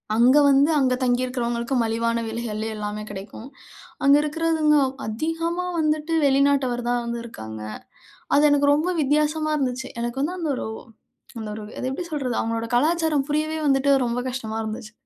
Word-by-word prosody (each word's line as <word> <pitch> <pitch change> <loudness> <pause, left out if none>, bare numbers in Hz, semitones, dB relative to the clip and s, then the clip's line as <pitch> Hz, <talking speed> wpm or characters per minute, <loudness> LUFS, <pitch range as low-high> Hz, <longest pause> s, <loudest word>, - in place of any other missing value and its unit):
அங்க 245 +5 +5
வந்து, 280 +2 +5
அங்க 260 -2 +2
தங்கியிருக்கிறவங்களுக்கு 245 0 -1
மலிவான 230 +1 0
விலைகள்லேயே 220 -1 -4
எல்லாமே 210 0 -4
கிடைக்கும். 205 +4 -8 0.6
அங்க 280 +1 +7
இருக்கிறவங்க 310 0 +1 0.3
அதிகமா 330 +10 -2
வந்துட்டு, 310 +1 0
வெளிநாட்டவர்தான் 265 -3 +2
வந்து 235 0 -3
இருக்காங்க. 110 - -8 0.8
அது 295 +1 +5
எனக்கு 285 0 +4
ரொம்ப 320 +5 0
வித்தியாசமா 305 +2 +1
இருந்துச்சு. 260 -1 -2
எனக்கு 240 +3 -3
வந்து 345 +6 -2
அந்தொரு 295 -9 -2 0.7
அந்தொரு 215 -1 -6 0.2
அதை - - -3
எப்படி 310 +7 -4
சொல்றது, 265 -5 -2
அவங்களோட 230 0 -2
கலாச்சாரம் 310 +1 +2
புரியவே 310 +1 0
வந்துட்டு, 275 0 +3
ரொம்ப 235 0 -1
கஷ்டமா 225 -4 -4
இருந்துச்சு. 215 0 -6
260 Hz, 135 wpm, -23 LUFS, 230-300 Hz, 0.8 s, அங்க